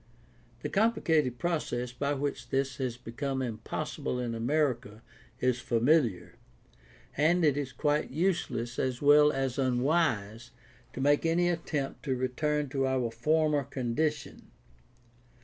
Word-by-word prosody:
The - - -2
complicated 165 - +2
process 125 -8 -2
by 140 +4 -1
which 140 +1 -3
this 135 -1 -1
has 125 -3 -3
become 130 +3 -3
impossible 115 +1 -4
in 120 -2 -2
America 120 -3 -1 0.4
is 125 -1 +1
familiar, 120 - +1 0.8
and 165 +4 +3
it 145 -3 +3
is 140 -2 -3
quite 150 +2 0
useless 130 -7 -1
as 130 -2 -1
well 150 +1 +6
as 135 -2 -2
unwise 125 -4 0 0.4
to 130 - -5
make 145 +1 +3
any 170 +2 +2
attempt 155 -5 -3
to 135 -2 0
return 145 +4 -1
to 135 0 0
our 130 -3 0
former 150 +4 +1
condition. 140 +3 -3
135 Hz, 125 wpm, -29 LUFS, 125-150 Hz, 0.8 s, well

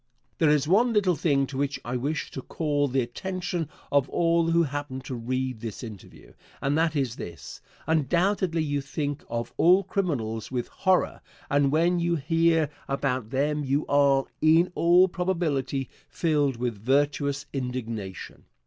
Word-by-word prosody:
There 160 - +4
is 150 -1 +3
one 230 +7 +4
little 200 -4 +3
thing 140 -3 +2
to 135 0 -7
which 140 0 -1
I 120 +1 -3
wish 145 +5 -2
to 135 - -6
call 145 0 -1
the 135 0 +1
attention 175 +4 -4 0.2
of 140 -1 +2
all 170 -1 +2
who 170 0 +4
happen 145 -2 -4
to 130 0 -7
read 130 0 -2
this 115 0 -6
interview, 105 -5 -11 0.3
and 140 +1 0
that 160 0 +1
is 130 -5 -1
this: 85 -5 -8 0.2
Undoubtedly 170 +3 +1
you 145 -2 -1
think 145 +1 -4
of 115 0 -4
all 180 +4 +5
criminals 130 - -2
with 125 -2 -3
horror 185 -1 +1 0.3
and 140 -1 +3
when 170 +3 +2
you 170 0 +1
hear 165 0 +2 0.2
about 130 -4 -1
them 145 +3 0
you 140 +2 0
are, 140 -1 +3 0.2
in 165 +3 +4
all 175 +2 +5
probability, 160 -8 -1 0.2
filled 150 -5 +1
with 120 -4 -3
virtuous 140 +2 +1
indignation. 115 -7 -5
145 Hz, 155 wpm, -26 LUFS, 130-165 Hz, 0.3 s, all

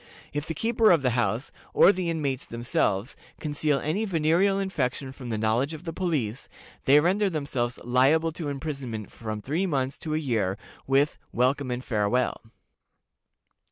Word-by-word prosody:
If 150 +1 -3
the 160 - -3
keeper 225 +4 +3
of 165 -5 +5
the 125 - +2
house, 120 +1 0 0.2
or - - +8
the 185 -3 -2
inmates 145 -6 -2
themselves, 115 -2 -1 0.2
conceal 150 -1 0
any 155 +10 -1
venereal 180 +1 +2
infection 140 -9 -2
from 130 -2 -9
the 110 - -1
knowledge 115 +8 +1
of 155 - -11
the 165 -2 -5
police, 140 - -2 0.4
they 140 +2 +7
render 195 +6 +2
themselves 135 -7 -2
liable 135 +7 +3
to 155 -1 -4
imprisonment 135 -6 -5
from 110 -2 -6
three 165 +8 0
months 135 -4 -1
to 155 -1 -2
a - - +2
year, 110 -10 0 0.3
with 135 +2 +2
"welcome 130 +2 +1
and 125 +1 -3
farewell." 115 +3 0
140 Hz, 155 wpm, -26 LUFS, 125-160 Hz, 0.4 s, or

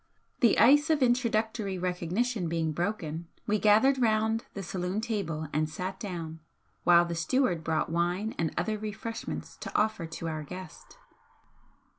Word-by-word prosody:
The 235 -5 +4
ice 290 +5 +6
of 305 -4 +3
introductory 225 -5 +1
recognition 180 +3 -1
being 165 -1 0
broken, 170 -2 -3 0.2
we 210 0 +1
gathered 240 +6 +4
round 220 0 +2
the 200 - -4
saloon 180 +2 -2
table 185 -9 -2
and 155 +1 +1
sat 185 +4 -5
down, 165 -5 -5 0.4
while 175 0 +6
the 170 - -3
steward 175 0 +1
brought 160 0 0
wine 175 +6 0
and 165 -2 +1
other 215 -1 -1
refreshments 215 +2 -5
to - - -7
offer 210 -6 0
to 165 +1 -6
our 155 -1 -3
guest. 180 +3 -10
190 Hz, 145 wpm, -29 LUFS, 165-220 Hz, 0.4 s, ice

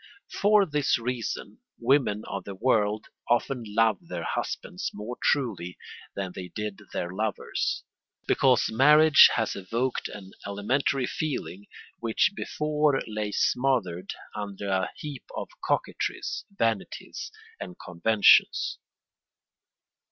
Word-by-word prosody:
For 205 0 +4
this 150 -4 +1
reason 120 -1 -4 0.2
women 120 -4 +2
of 100 -1 -5
the 100 0 -7
world 105 -1 +1 0.2
often 120 +1 +1
love 110 -1 +2
their - - -4
husbands - - -3
more 105 +4 -5
truly 105 -11 0 0.4
than 95 -2 -3
they 90 -1 -6
did 105 +1 -5
their 85 - -3
lovers, 105 +1 -2 0.4
because 130 -3 +3
marriage 150 +5 +8
has 115 -2 0
evoked 115 +7 -2
an 95 -2 -10 0.2
elementary 125 +6 0
feeling 100 - -4 0.3
which 115 - +2
before 150 -5 +1
lay 105 -1 -3
smothered 100 -9 +1 0.3
under 100 -1 -5
a 95 -1 +1
heap 145 -3 -7
of - - -4
coquetries, - - -2
vanities, 115 - -3 0.3
and 90 - -7
conventions. 100 +4 +3
110 Hz, 110 wpm, -27 LUFS, 100-135 Hz, 0.4 s, marriage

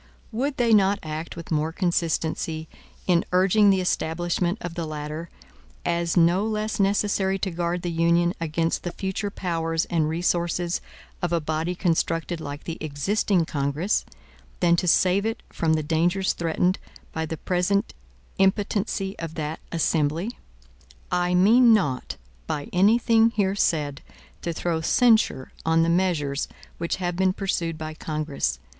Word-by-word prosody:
Would 265 +5 -2
they 235 -2 +3
not 200 -1 +4
act 155 +1 -5
with 170 0 -9
more 155 +1 +1
consistency, 165 -2 -1 0.4
in 175 -2 +3
urging 195 +3 +4
the 190 -1 +3
establishment 175 +1 0
of 175 -7 -5
the 170 -1 -4
latter, 155 +2 -5 0.6
as 170 0 0
no 175 +3 +4
less 215 0 -2
necessary 195 -1 +2
to 190 -1 -2
guard 170 +1 -2
the 175 - -2
Union 170 +1 +2
against 165 +1 0
the 175 - -5
future 195 +2 -3
powers 165 -4 -1
and 160 -3 +2
resources 175 +1 0 0.4
of 175 - -1
a 170 - +2
body 160 +3 -2
constructed 165 -1 0
like 145 0 -6
the 165 - -6
existing 170 +5 +1
Congress, 145 +7 0 0.6
than 170 -1 +4
to 180 - 0
save 185 +3 +4
it 225 +1 -3
from 160 -1 +1
the 155 - -1
dangers 175 +5 +1
threatened 170 +3 0 0.3
by 160 0 -2
the 160 - -4
present 180 +4 0 0.5
impotency 195 0 +1
of 165 -1 -5
that 155 0 -3
Assembly? 165 +4 0 0.8
I 180 0 +1
mean 225 +5 +6
not, 145 -11 -1 0.3
by 145 - -3
any 200 +6 +5
thing 230 -1 +4
here 195 -2 +2
said, 150 -7 0 0.4
to 170 - -2
throw 165 0 -1
censure 220 - +3
on 160 0 +3
the 165 - +1
measures 170 -6 +1 0.3
which 170 0 -1
have 175 -2 -2
been 185 +1 +2
pursued 170 -5 -2
by 155 0 -5
Congress. 150 - -2
170 Hz, 150 wpm, -25 LUFS, 160-190 Hz, 0.8 s, mean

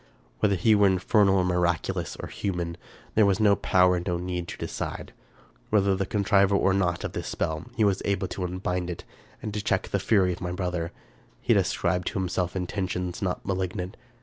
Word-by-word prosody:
Whether 100 -2 +3
he 110 +5 +4
were 100 -1 +5
infernal 95 +1 +3
or 95 - +3
miraculous 90 -1 0
or - - -5
human, 90 -4 -3 0.4
there 110 - +5
was 100 +1 +2
no 105 -2 +5
power 90 -1 +3
and 85 - -5
no 90 -1 0
need 90 -1 -3
to - - -7
decide. - - -5 0.6
Whether 100 -2 +3
the 95 0 -2
contriver 100 -1 +3
or 95 -1 +3
not 90 -3 0
of - - -3
this - - -5
spell, 80 +2 -2
he 110 - +3
was 100 -2 +2
able 100 -1 0
to 95 - -4
unbind 90 0 -2
it, 85 - -6 0.4
and 105 - -4
to 105 - -2
check 95 -1 0
the 100 - 0
fury 95 -2 +3
of 90 - -9
my 90 -1 -3
brother. 90 -2 -2 0.5
He - - +2
had - - +5
ascribed 90 0 -1
to - - -2
himself 90 0 -1
intentions 90 -1 -3
not 90 -2 -2
malignant. 95 0 -2
95 Hz, 200 wpm, -26 LUFS, 90-100 Hz, 0.6 s, were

